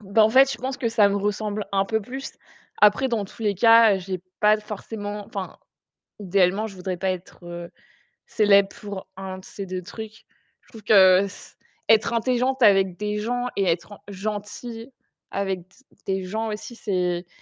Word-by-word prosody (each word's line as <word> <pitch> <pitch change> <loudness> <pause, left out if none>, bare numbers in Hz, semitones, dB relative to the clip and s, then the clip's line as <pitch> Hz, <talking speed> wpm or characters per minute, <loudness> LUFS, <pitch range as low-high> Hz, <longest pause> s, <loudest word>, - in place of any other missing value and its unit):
bah, 215 +3 +4
en 220 - +3
fait, 265 +2 +6
je - - -7
pense 260 +1 -4
que 235 - -1
ça 220 -3 +4
me 200 - 0
ressemble 210 +1 -2
un 195 0 +2
peu 220 +2 -1
plus. 260 +6 -7 0.5
Après, 210 +6 +5
dans 225 -4 -1
tous 225 +4 -12
les 205 -2 +1
cas, 225 +1 +6
heu, 190 - -2
j'ai 185 -1 -5 0.2
pas 210 0 +5
forcément, 210 -1 -6
enfin, 195 -3 -6 0.6
idéalement, 195 +2 +2
je 200 - -9
voudrais 185 0 -4
pas 190 +2 -1
être, 185 0 -7
heu, 175 0 -7 0.6
célèbre 200 -2 +4
pour 200 -2 -7
1 190 -1 -6
de 185 - -14
ces 195 0 -8
2 185 0 -5
trucs. 220 +3 -10 0.4
Je - - -30
trouve 220 -2 -13
que 190 -3 +6
s 200 -1 -7 0.3
être 225 +1 +4
intelligente 255 +2 0
avec 195 -4 +5
des 210 0 -3
gens 245 +3 -2
et 195 - +1
être 170 +4 -1
en - - -12
gentille 215 +4 -6 0.4
avec 195 -2 -2
d 175 - -19 0.4
des 190 -1 -1
gens 220 +4 -3
aussi, 215 +3 -7
c'est 180 -4 -1
205 Hz, 185 wpm, -24 LUFS, 190-220 Hz, 0.6 s, fait